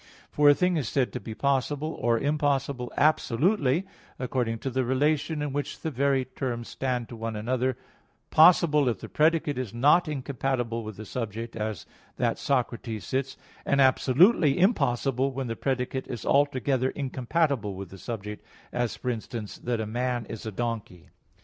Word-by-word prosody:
For 145 0 +5
a 145 - +7
thing 180 +1 +2
is 135 -8 -2
said 130 -3 0
to - - -3
be 110 - -7
possible 140 +4 0
or 115 0 +3
impossible 140 -2 0
absolutely, 155 - +2 0.3
according 125 -3 -1
to 135 - -3
the 130 +1 0
relation 145 +4 +1
in 145 -2 -3
which 145 0 -3
the 160 - -2
very 135 0 +1
terms 125 -3 -4
stand 125 -3 -2
to 120 - -8
one 115 0 -4
another, 125 +3 -1 0.5
possible 155 -4 +6
if 115 - -1
the - - -8
predicate 155 -3 +2
is 120 -4 -5
not 150 +8 +4
incompatible 130 -4 -2
with 110 -2 -8
the 110 - -7
subject, 115 +1 -5
as 110 -5 -4 0.3
that - - 0
Socrates 120 -6 -1
sits; 135 0 -2 0.3
and 140 - +1
absolutely 140 - +4
impossible 135 - +2
when 135 0 -3
the 115 -1 -3
predicate 130 +1 -2
is 120 - -6
altogether 135 -2 +2
incompatible 135 - -1
with 95 -2 -8
the 95 - -11
subject, 105 -2 -6 0.3
as, 120 -2 -1
for 125 - -2
instance, 110 -2 -6
that 120 -1 -2
a 110 - -1
man 120 +1 -2
is 110 +1 -7
a - - -3
donkey. 110 -6 -4
130 Hz, 165 wpm, -27 LUFS, 115-145 Hz, 0.5 s, a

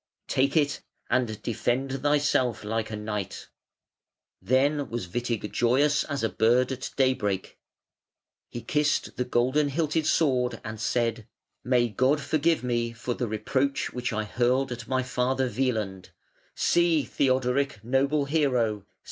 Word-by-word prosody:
Take 140 +4 +1
it 145 -2 +1 0.3
and 120 -4 0
defend 130 +4 -1
thyself 145 -5 +1
like 110 +1 -2
a 110 - -4
knight". 105 -2 -5 0.9
Then 140 +1 +1
was 115 -5 -4
Witig 115 +1 -3
joyous 140 +5 +2
as 140 -5 -3
a - - +3
bird 120 +4 +2
at 130 -1 -4
daybreak. 120 -8 0 0.9
He 120 - -6
kissed 150 -4 0
the 125 - +1
golden 130 +4 +1
hilted 155 +1 0
sword 130 -7 +2
and 110 -1 -6
said: 115 -2 -1 0.4
"May 125 -1 +3
God 130 +7 +2
forgive 155 +1 +1
me 120 -1 -1
for 120 +1 -3
the 120 0 -3
reproach 130 +6 -1
which 125 0 -2
I 110 -1 -1
hurled 125 +4 +1
at 120 -1 -6
my 130 -1 0
father, 130 +1 0
Wieland. 110 -8 -2 0.5
See! 170 -3 +3
Theodoric, 130 -3 0
noble 135 +4 +1
hero! 125 -9 0
125 Hz, 135 wpm, -27 LUFS, 115-140 Hz, 0.9 s, a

